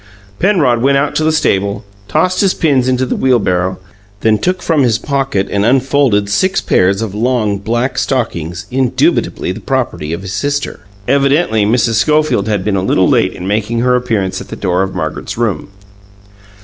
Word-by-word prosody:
Penrod 155 - +2
went 140 +2 +3
out 140 +1 0
to 155 - 0
the 160 - +2
stable, 100 -11 0 0.2
tossed 180 - +1
his 195 -2 +2
pins 135 -6 +1
into 130 0 +1
the - - -2
wheelbarrow, 95 -8 +1 0.4
then 110 -1 +2
took 180 - -1
from 160 -4 +2
his 120 -5 +2
pocket 135 -7 -1
and 100 0 0
unfolded 130 -3 +2
six 185 - +1
pairs 95 +4 +1
of 105 -4 -5
long 110 -2 0
black 120 +5 -1
stockings, 90 - -2
indubitably 130 -1 0
the - - -6
property 75 +1 -2
of 85 +3 -4
his 95 0 -6
sister. 145 +7 -2 0.3
(Evidently 140 -4 +2
Mrs. 115 0 +1
Schofield 150 -4 +1
had 105 -4 -1
been 105 -2 0
a 95 - 0
little 95 0 +2
late - - +2
in 90 - -7
making 110 +3 -1
her 125 0 +2
appearance 110 -7 -1
at - - -10
the - - -7
door 90 +1 0
of 95 0 -3
Margaret's - - -4
room.) 115 -5 -2
120 Hz, 175 wpm, -14 LUFS, 100-140 Hz, 0.4 s, went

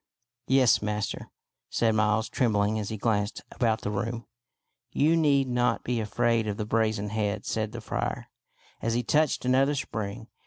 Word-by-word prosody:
" 120 0 -64
Yes, 130 -3 +4
master," 105 0 -3 0.4
said 115 -1 +2
Miles, 110 0 +2
trembling 110 -3 +1
as 105 - -4
he 110 - -4
glanced 105 -1 -1
about 115 -3 0
the 105 - -3
room. 115 +3 -3 0.3
" 120 0 -55
You 160 +3 +5
need 140 -4 +3
not 120 -1 +1
be 120 -1 -1
afraid 115 +1 +1
of 105 -1 -2
the 105 - -2
brazen 110 -2 0
head," 105 -1 -2
said 110 -1 -2
the 120 0 -7
friar, - - -3 0.5
as 115 0 0
he 120 - 0
touched 150 +1 +1
another 135 +3 +3
spring. 110 -4 -4
110 Hz, 170 wpm, -27 LUFS, 105-125 Hz, 0.5 s, You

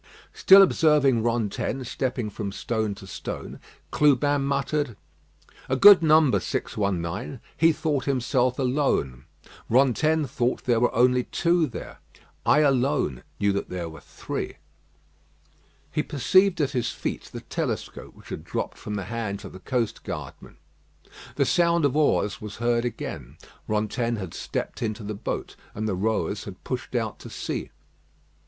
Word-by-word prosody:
Still 195 +1 +8
observing 150 -9 +3
Rantaine 120 +3 -1
stepping 125 -2 -3
from 100 -1 -4
stone 110 0 -2
to 100 - -12
stone, 95 - -7 0.3
Clubin 145 -1 +3
muttered: 140 -3 -1 0.7
"A 130 - +2
good 200 +6 +9
number 155 -3 +5
619. 100 +5 -3 0.2
He 165 +1 +5
thought 150 -4 -1
himself 130 -1 +1
alone. 125 - 0 0.4
Rantaine 140 +5 +3
thought 120 0 -1
there 120 -2 +2
were 120 - +2
only 125 +1 +3
two 170 -1 +1
there. - - -9 0.5
I 150 - +5
alone 135 - +1 0.2
knew 100 0 +2
that 100 - -3
there 90 -2 -4
were 80 -2 -11
three." - - -6 1.4
He 150 - 0
perceived 185 +6 +3
at 140 -2 +1
his 125 -4 -1
feet - - -4
the - - -9
telescope - - -4
which - - -16
had - - -6
dropped - - -4
from 105 - -5
the 100 - -3
hands 110 -2 -4
of - - -9
the 95 - -10
coast 120 +1 -2
guardman. - - -8 0.8
The - - +2
sound 170 -2 +3
of 140 -1 +1
oars 145 -8 +1
was 105 -2 -7
heard 120 +1 +1
again. 120 - -6 0.3
Rantaine 110 +3 -1
had 95 -6 -6
stepped - - -4
into 110 -1 -3
the 105 +1 -4
boat, 100 - -5 0.2
and 110 +1 -2
the 105 - 0
rowers 110 +4 -1
had - - -10
pushed - - -5
out - - -2
to - - -10
sea. - - -4
125 Hz, 145 wpm, -25 LUFS, 105-145 Hz, 1.4 s, good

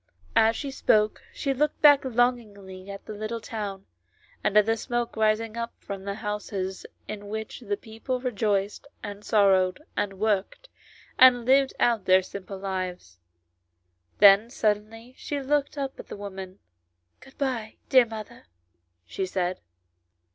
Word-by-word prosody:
As 225 0 +5
she 280 +3 -4
spoke 215 -5 +2
she 275 - -2
looked 300 +3 0
back 290 -2 +8
longingly 215 -7 -1
at 200 0 -8
the 215 - -7
little 215 +2 -4
town, 205 -4 -6 0.6
and 210 - +2
at 210 - +6
the 225 0 +2
smoke 240 +1 -3
rising 220 +1 +1
up 235 0 -4
from 195 -1 -7
the 200 0 -3
houses 210 -3 -4 0.2
in 205 -1 -7
which 220 +1 -5
the 205 -4 -3
people 225 +4 -5
rejoiced, 210 -2 -1 0.2
and 205 0 -7
sorrowed, 190 -3 +3 0.2
and 195 -1 -2
worked, 210 - -1 0.5
and 245 -2 +7
lived 270 +1 +4
out 230 -5 +2
their 185 0 +5
simple 195 +1 -8
lives. 185 - -5 1.0
Then 205 +2 +7
suddenly 225 +1 -2
she 290 - -3
looked 285 +1 0
up 275 -1 -4
at - - -9
the - - -8
woman. 190 -2 -8 0.6
"Good 270 - -17
bye, 245 -6 -2
dear 255 -3 +6
mother," 215 - -9 0.6
she 190 - -3
said. 180 -1 -2
215 Hz, 145 wpm, -26 LUFS, 195-240 Hz, 1.0 s, back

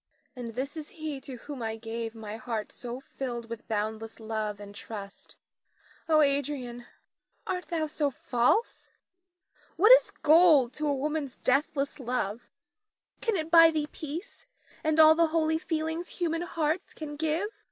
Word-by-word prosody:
Nina. 245 -2 -6
And 230 - -8
this 275 +5 -3
is 310 -2 -6
he 305 -3 -4
to 265 -1 -8
whom 275 +2 -8
I 220 -1 -2
gave 225 0 -5
my 215 -1 -7
heart 225 -2 -4
so 245 0 -6
filled 240 -4 -6
with 230 - -7
boundless 220 +1 -3
love 215 -2 -3
and 205 0 -10
trust. 200 -1 -9 0.7
Oh, 310 -1 +6
Adrian, 275 -4 -1 0.6
art 365 -1 -3
thou 325 -3 -1
so 300 -1 0
false? 250 - 0 0.9
What 420 +7 +6
is - - +8
gold 305 -6 +5
to 300 0 -2
a 285 - +2
woman's 295 -1 -2
deathless 275 +2 0
love? 245 -3 -3 0.7
Can 455 -3 +1
it 320 -2 -2
buy 330 -1 +9
thee 305 -2 -1
peace 330 - -7 0.4
and 315 0 +1
all 315 0 +9
the 335 +1 +3
holy 320 0 +1
feelings 320 +1 -2
human 330 -2 -2
hearts 330 0 -2
can 300 -2 -6
give? 320 +7 -1
285 Hz, 155 wpm, -29 LUFS, 235-320 Hz, 0.9 s, buy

